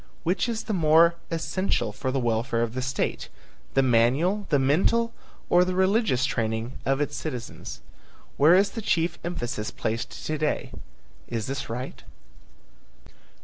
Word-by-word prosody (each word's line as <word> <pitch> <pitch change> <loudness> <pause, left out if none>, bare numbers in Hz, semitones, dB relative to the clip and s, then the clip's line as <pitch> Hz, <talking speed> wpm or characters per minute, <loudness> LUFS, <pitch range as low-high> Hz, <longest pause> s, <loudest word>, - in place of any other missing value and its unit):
Which 180 +8 +1
is 225 -1 -2
the 215 - -3
more 165 -1 +5 0.2
essential 170 +3 -1
for 130 - -3
the 135 - 0
welfare 115 0 0
of 115 -1 -3
the 130 - -2
state, 130 +1 -2 0.5
the 135 - +5
manual, 135 - +2
the 145 - +4
mental 185 +13 +2 0.3
or 175 0 +5
the 180 0 -1
religious 190 - +2
training 115 0 -2
of 135 0 +2
its 145 0 -1
citizens? 125 -4 -6 0.5
Where 155 +5 +6
is 200 +1 +4
the 225 - -5
chief 170 -4 0
emphasis 120 -11 -3
placed 110 +3 -4
to 155 - -1
day? 150 -1 -1 0.6
Is 115 -2 -3
this 135 -1 -4
right? 125 +3 -5
145 Hz, 145 wpm, -26 LUFS, 120-180 Hz, 0.6 s, Where